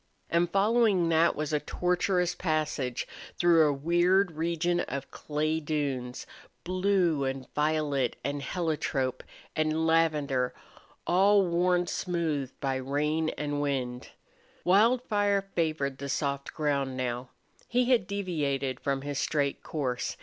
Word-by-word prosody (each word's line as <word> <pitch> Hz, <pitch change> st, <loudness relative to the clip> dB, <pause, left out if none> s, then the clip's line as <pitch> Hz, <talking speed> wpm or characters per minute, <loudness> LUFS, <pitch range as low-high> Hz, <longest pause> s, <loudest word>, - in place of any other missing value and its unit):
And 170 Hz, +1 st, +2 dB
following 200 Hz, -2 st, +3 dB
that 165 Hz, +1 st, +3 dB
was 155 Hz, 0 st, -3 dB
a 150 Hz, -, +3 dB
tortuous 180 Hz, +3 st, 0 dB
passage 155 Hz, -7 st, -1 dB, 0.3 s
through 165 Hz, -3 st, +5 dB
a -, -, +2 dB
weird 175 Hz, +6 st, +2 dB
region 170 Hz, +2 st, 0 dB
of 140 Hz, -5 st, -4 dB
clay 155 Hz, +1 st, -1 dB
dunes, 140 Hz, -5 st, -3 dB, 0.4 s
blue 180 Hz, -4 st, +1 dB
and 135 Hz, -1 st, -3 dB
violet 150 Hz, -4 st, 0 dB
and 140 Hz, +2 st, -2 dB
heliotrope 150 Hz, -6 st, -2 dB, 0.3 s
and 155 Hz, +1 st, +1 dB
lavender, 150 Hz, -6 st, +1 dB, 0.5 s
all 195 Hz, +2 st, +4 dB
worn 175 Hz, +1 st, +2 dB
smooth 165 Hz, -7 st, -2 dB
by 135 Hz, -1 st, -1 dB
rain 150 Hz, +4 st, 0 dB
and 145 Hz, -1 st, -2 dB
wind. 130 Hz, -3 st, -2 dB, 0.5 s
Wildfire 205 Hz, 0 st, +3 dB
favored 155 Hz, -5 st, -1 dB
the 140 Hz, 0 st, -5 dB
soft 140 Hz, 0 st, -2 dB
ground 140 Hz, -4 st, -1 dB
now. 125 Hz, 0 st, -3 dB, 0.4 s
He 250 Hz, +1 st, +2 dB
had 230 Hz, -8 st, +3 dB
deviated 145 Hz, -10 st, -2 dB
from 135 Hz, -1 st, -2 dB
his 145 Hz, -1 st, -3 dB
straight 140 Hz, -3 st, 0 dB
course. 130 Hz, -5 st, -3 dB
155 Hz, 120 wpm, -29 LUFS, 140-175 Hz, 0.5 s, through